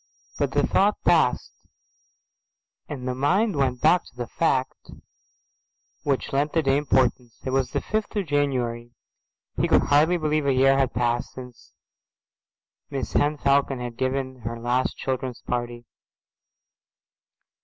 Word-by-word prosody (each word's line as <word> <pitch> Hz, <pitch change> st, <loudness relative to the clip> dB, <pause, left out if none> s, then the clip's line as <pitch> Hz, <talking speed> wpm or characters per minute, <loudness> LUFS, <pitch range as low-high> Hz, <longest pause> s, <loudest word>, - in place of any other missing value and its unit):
But -, -, 0 dB
the -, -, +2 dB
thought 205 Hz, +2 st, +2 dB
palled, 160 Hz, -8 st, +4 dB, 1.5 s
and 130 Hz, -4 st, -5 dB
the 125 Hz, -, -1 dB
mind 185 Hz, -, +1 dB
went 130 Hz, -3 st, 0 dB
back 175 Hz, +4 st, +4 dB
to -, -, -18 dB
the 120 Hz, -1 st, -4 dB
fact 130 Hz, 0 st, -1 dB, 1.1 s
which 140 Hz, -2 st, -2 dB
lent 145 Hz, +2 st, 0 dB
the 165 Hz, -, +2 dB
day 135 Hz, -1 st, +2 dB
importance. 125 Hz, -4 st, 0 dB
It 130 Hz, -, -2 dB
was 135 Hz, -1 st, +1 dB
the -, -, -2 dB
fifth 215 Hz, +1 st, -3 dB
of 205 Hz, -2 st, 0 dB
January. 125 Hz, -5 st, -1 dB, 0.6 s
He -, -, +2 dB
could -, -, +4 dB
hardly 155 Hz, +5 st, +3 dB
believe 155 Hz, -2 st, 0 dB
a 135 Hz, -, +3 dB
year 135 Hz, +1 st, +4 dB
had 135 Hz, -3 st, 0 dB
passed 120 Hz, +1 st, -1 dB
since 125 Hz, -2 st, -12 dB, 1.2 s
Mrs 135 Hz, -2 st, -1 dB
Henne 150 Hz, +1 st, +1 dB
Falcon 140 Hz, -2 st, +1 dB
had 120 Hz, -1 st, -6 dB
given 130 Hz, +1 st, -2 dB
her 115 Hz, 0 st, -5 dB
last 120 Hz, +2 st, -1 dB
children's 130 Hz, -2 st, -4 dB
party. 120 Hz, -1 st, -4 dB
135 Hz, 140 wpm, -24 LUFS, 125-145 Hz, 1.5 s, palled